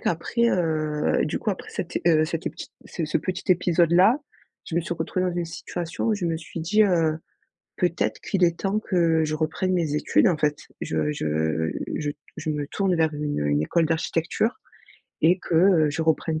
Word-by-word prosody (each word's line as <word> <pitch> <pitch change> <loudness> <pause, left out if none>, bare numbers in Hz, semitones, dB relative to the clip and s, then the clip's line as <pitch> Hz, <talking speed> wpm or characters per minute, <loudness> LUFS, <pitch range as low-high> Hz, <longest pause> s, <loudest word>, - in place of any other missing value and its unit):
qu'après, 235 +8 0
heu, 155 -3 0
du 150 - -2
coup, 215 - -1
après 190 - -6
cet, 170 - -3
heu, 155 -2 +5
cet, 165 0 -4
heu, - - 0
petit - - -9 0.2
ce 165 - -4
ce 155 - 0
petit 180 +3 -4
épisode-là, 180 - +4 0.5
je 160 - -6
me 170 - +3
suis 170 - -4
retrouvée 175 +3 -1
dans 175 - -3
une 175 - -1
situation 165 0 -5
où 220 - +3
je 185 -4 -2
me 165 -1 0
suis 165 +1 -7
dit, 210 +7 +3
heu: 165 -4 +2 0.6
«Peut-être - - 0
qu'il 195 -4 0
est 170 -1 +2
temps 200 +2 0
que 165 -6 +2
je 155 0 -2
reprenne 160 +4 -1
mes 160 -4 0
études, 180 - +3
en 170 -4 +2
fait. 150 0 +1 0.2
Je 150 - -1
je 80 - -1 0.2
je 145 -1 -2 0.3
je 155 - -4
me 145 -2 -2
tourne 195 +1 0
vers 160 -1 +1
une 150 0 -2
une 75 +1 +2
école 165 - +2
d'architecture 165 - -1 0.6
et 175 +4 +4
que, 175 - -4
heu, 165 -3 +5
je 160 +3 -2
reprenne 160 0 0
165 Hz, 200 wpm, -24 LUFS, 155-180 Hz, 0.6 s, heu